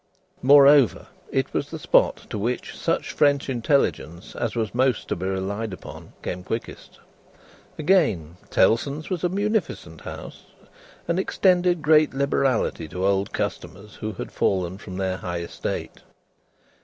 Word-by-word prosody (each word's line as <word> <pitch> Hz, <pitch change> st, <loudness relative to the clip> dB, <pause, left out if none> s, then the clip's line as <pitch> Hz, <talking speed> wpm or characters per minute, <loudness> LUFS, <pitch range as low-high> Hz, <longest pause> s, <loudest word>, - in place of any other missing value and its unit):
Moreover, 140 Hz, -, +6 dB, 0.2 s
it -, -, -1 dB
was -, -, -2 dB
the -, -, -6 dB
spot -, -, +2 dB
to 105 Hz, -, -3 dB
which 120 Hz, +4 st, -3 dB
such -, -, -1 dB
French 140 Hz, -2 st, +2 dB
intelligence 90 Hz, -, -1 dB
as 120 Hz, -1 st, -2 dB
was 110 Hz, -3 st, -2 dB
most 130 Hz, -1 st, +1 dB
to -, -, 0 dB
be 95 Hz, +2 st, -4 dB
relied 100 Hz, +3 st, -3 dB
upon, -, -, -10 dB
came 90 Hz, 0 st, -4 dB
quickest. 115 Hz, +5 st, -6 dB, 0.8 s
Again: 140 Hz, -, +1 dB
Tellson's 140 Hz, -, +1 dB
was 180 Hz, -2 st, -2 dB
a 180 Hz, -, +2 dB
munificent 210 Hz, +3 st, -2 dB
house, -, -, -9 dB, 0.6 s
and 170 Hz, +2 st, +1 dB
extended 180 Hz, -3 st, +2 dB
great 155 Hz, -1 st, +4 dB
liberality 135 Hz, -, 0 dB
to 90 Hz, +4 st, -3 dB
old 100 Hz, 0 st, +1 dB
customers 105 Hz, +1 st, -5 dB
who 110 Hz, 0 st, -4 dB
had -, -, -7 dB
fallen 95 Hz, -1 st, 0 dB
from 95 Hz, -2 st, -8 dB
their 95 Hz, -1 st, -1 dB
high 85 Hz, -2 st, -4 dB
estate. 85 Hz, -, -5 dB
115 Hz, 140 wpm, -24 LUFS, 95-145 Hz, 0.8 s, Moreover